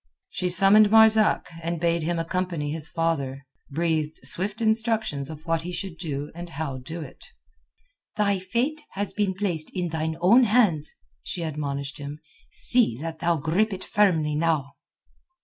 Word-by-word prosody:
She 180 - -1
summoned 195 +4 +6
Marzak, 220 0 +5 0.2
and 170 0 -3
bade 170 0 +1
him 170 +2 -1
accompany 165 -3 -2
his 160 0 -3
father, 140 -5 -2 0.2
breathed 155 0 -1
swift 200 +4 +1
instructions 220 - +2
of 155 0 -9
what 165 -1 0
he 175 +2 -6
should 175 -1 -6
do 145 -4 -4
and 175 +1 -8
how 145 -4 -4
do 160 +7 -7
it. - - -11 0.9
"Thy 200 -2 +2
fate 240 +11 -1
has 200 +1 -3
been 200 -3 0
placed 175 -6 -1
in 180 -2 -1
thine 160 0 -3
own 225 +9 +6
hands," 205 -10 +2 0.3
she 170 - -4
admonished 145 -2 -4
him. 145 +1 -7 0.3
"See 240 - +3
that 160 +1 -6
thou 170 0 +1
grip 175 +9 +1
it 190 0 -5
firmly 165 -8 +2
now." 150 -3 0
170 Hz, 155 wpm, -25 LUFS, 155-200 Hz, 0.9 s, summoned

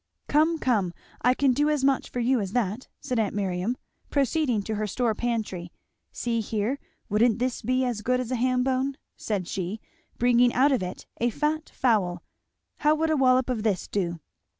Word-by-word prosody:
"Come, 315 +3 +3
come, 210 - 0 0.3
I 250 +2 +4
can 275 -1 +3
do 295 +4 +2
as 300 -3 +1
much 270 -1 +2
for 245 - -4
you 245 +1 +2
as 195 -2 -3
that," 230 0 -1
said 250 -2 -1
aunt 210 -2 0
Miriam, 195 +4 -1 0.3
proceeding 275 -5 +1
to 220 - -3
her 215 0 -1
store 235 +1 0
pantry, 215 -7 -3 0.4
"see 235 -1 -1
here 220 +5 -1 0.3
wouldn't 220 +2 +3
this 250 0 -1
be 255 +3 +1
as 240 -4 -2
good 250 +3 +1
as 255 -1 -4
a - - +1
ham 250 +1 +2
bone?" 265 +1 0 0.2
said 200 -5 -3
she, 190 +3 -3 0.4
bringing 245 0 +4
out 275 +3 +5
of 260 - +2
it 180 0 -5
a 240 - +1
fat 300 +5 -1
fowl; 195 -8 +1 0.5
"how 300 +1 +3
would 320 +1 +1
a - - +3
wallop 255 -2 +4
of 250 -4 -1
this 210 -4 0
do?" 175 -4 -2
245 Hz, 190 wpm, -26 LUFS, 210-260 Hz, 0.5 s, out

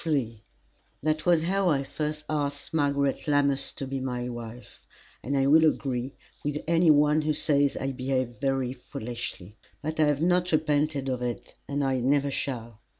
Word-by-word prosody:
III 120 -9 -1 0.6
That 155 +2 0
was 170 -2 +4
how 190 +2 +1
I 140 -4 +2
first 150 +2 -4
asked 145 -1 -2
Margaret 140 -2 +1
Lammas 140 -2 +2
to 135 - -5
be 135 0 -3
my 125 -2 -3
wife, 120 0 -9 0.4
and 140 +2 -1
I 135 - +3
will 155 +3 +6
agree 135 -4 0 0.3
with 145 0 -1
any 170 0 +4
one 150 +1 +5
who 155 0 0
says 145 -2 +2
I 135 - -2
behaved 130 -1 -2
very 135 -2 0
foolishly. 115 -5 -7 0.3
But 155 +1 -3
I 155 - +5
have 145 -1 +1
not 180 +1 +2
repented 150 -2 +1
of 130 -2 -2
it, 120 -1 -4
and 145 0 -1
I 135 -1 +1
never 140 +3 +2
shall. 115 -6 -4
140 Hz, 170 wpm, -27 LUFS, 130-150 Hz, 0.6 s, will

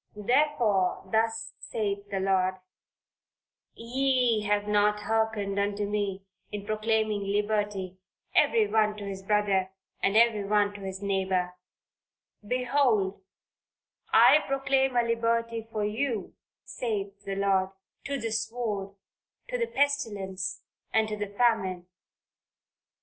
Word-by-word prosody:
"Therefore, 210 -6 +1
thus 225 0 0
saith 200 -2 -3
the 195 -1 -2
Lord 190 -1 +1 1.2
ye 250 -1 +1
have 205 0 +1
not 210 0 +2
hearkened 220 -2 0
unto 205 0 -1
me 200 -2 -2 0.3
in 205 -1 -5
proclaiming 215 -1 0
liberty 205 -2 -1 0.3
every 455 -2 +4
one 215 - +1
to 205 - -7
his 195 -1 -5
brother, 195 -2 +1 0.3
and 195 +2 +2
every 225 -3 +4
one 205 0 +2
to 205 - -10
his 190 0 -6
neighbor 190 -2 0 0.9
behold 240 -4 +1 0.9
I 300 - +7
proclaim 270 -1 +1
a 240 - +4
liberty 230 -1 0
for 210 -1 -1
you 225 0 -2 0.3
saith 205 -4 -4
the 195 -1 -4
Lord, 195 -1 +2 0.4
to 280 0 -2
the 225 -1 -3
sword, 220 -3 -3 0.5
to - - -1
the 470 - 0
pestilence 205 - -1 0.3
and 220 0 +2
to 215 - -2
the 205 0 -3
famine." 200 -5 +1
210 Hz, 115 wpm, -28 LUFS, 200-230 Hz, 1.2 s, I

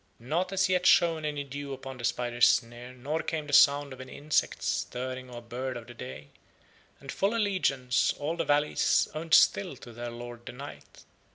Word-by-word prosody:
Not 165 +10 -2
as 195 0 +2
yet 185 -1 +2
shone 165 -2 +4
any 145 -1 -2
dew 140 0 -6
upon 135 0 -8
the - - -8
spider's 120 0 +3
snare 120 +1 -1
nor 140 +6 -3
came 155 -2 -3
the 145 - -7
sound 140 0 +5
of 130 - -10
any 130 0 -10
insects 150 +1 0
stirring 130 +1 -3
or 120 -1 -9
bird 125 +2 -4
of 120 - -9
the 120 - -11
day, 65 - -9 0.7
and 135 -1 -8
full 200 +4 0
allegiance 160 - +1
all 150 +3 -2
the 170 - -1
valleys 145 +1 +2
owned 165 +2 +2
still 185 -8 +4
to 120 -1 -12
their 120 +1 -6
Lord 120 0 -9
the - - -6
Night. 140 +3 -11
135 Hz, 190 wpm, -29 LUFS, 120-155 Hz, 0.7 s, sound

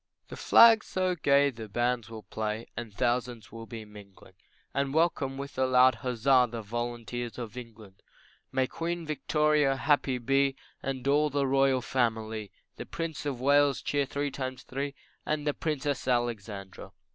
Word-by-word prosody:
The - - -7
flags 225 -1 +6
so 185 -1 0
gay 140 -3 +3
the 110 -3 -9
bands 120 +1 -1
will 110 -1 -9
play, 110 +1 -4
And 115 -1 -6
thousands 120 +1 -1
will 115 +1 -9
be 115 -2 -8
mingling, 100 -3 -15 0.4
And 140 +1 -1
welcome 150 -5 +1
with 140 -1 -6
a 130 - +3
loud 130 -1 +5
huzza 125 +1 +3
The 115 -1 -6
volunteers 120 +1 -4
of 115 -3 -6
England. 110 -5 -11 0.5
May 130 0 +2
Queen 170 +4 -4
Victoria 150 -2 +2
happy 135 -2 +1
be, 135 +2 +1 0.3
And 135 -1 -4
all 150 +2 +3
the 140 0 0
royal 135 -1 +3
family, 110 -4 -1 0.3
The - - -7
Prince 165 -3 -4
of 135 -4 -3
Wales, 140 +1 +4
cheer 145 -1 0
three 145 +1 -2
times 130 -1 -5
three 140 +1 -4 0.3
And 150 -1 -2
the 145 - +1
Princess 145 -4 -2
Alexandra. 110 -6 -3
130 Hz, 155 wpm, -29 LUFS, 115-140 Hz, 0.5 s, flags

